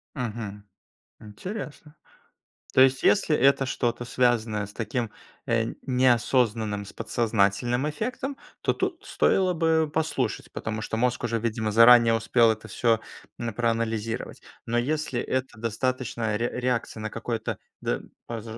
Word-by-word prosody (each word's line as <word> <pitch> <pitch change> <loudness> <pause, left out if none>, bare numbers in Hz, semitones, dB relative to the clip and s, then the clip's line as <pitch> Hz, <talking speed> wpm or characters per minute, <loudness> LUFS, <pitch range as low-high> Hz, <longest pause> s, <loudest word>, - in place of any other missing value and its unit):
Мгм. 110 -5 -5 0.6
Интересно. 150 - -8 0.8
То - - +6
есть, 135 0 +5
если 180 -6 +3
это 135 0 +4
что-то 120 -2 -1
связанное 115 -4 +1
с 105 - -14
таким, 115 +1 -2 0.4
э, 115 -1 +1
неосознанным 120 -4 +2
с - - -12
подсознательным 115 +3 +1
эффектом, 255 - -4 0.2
то - - +1
тут 380 -3 -3
стоило 185 -1 +2
бы 160 -1 +2
послушать, 145 -7 -2
потому 110 0 -4
что 110 - -3
мозг 125 +2 0
уже 115 -1 0
видимо 110 -1 -1
заранее 115 +1 +7
успел 115 0 +4
это 110 0 -6
всё, 115 -2 +2 0.4
м, 115 -1 -3
проанализировать. 115 -1 -2 0.2
Но 120 +1 0
если 140 0 -1
это 130 -1 -2
достаточная 115 -1 -1
ре 120 - 0
реакция 120 -3 -1
на 110 - -3
какое-то, 115 0 -3 0.2
д - - -1 0.3
пож 115 -2 -5
120 Hz, 130 wpm, -26 LUFS, 110-130 Hz, 0.8 s, заранее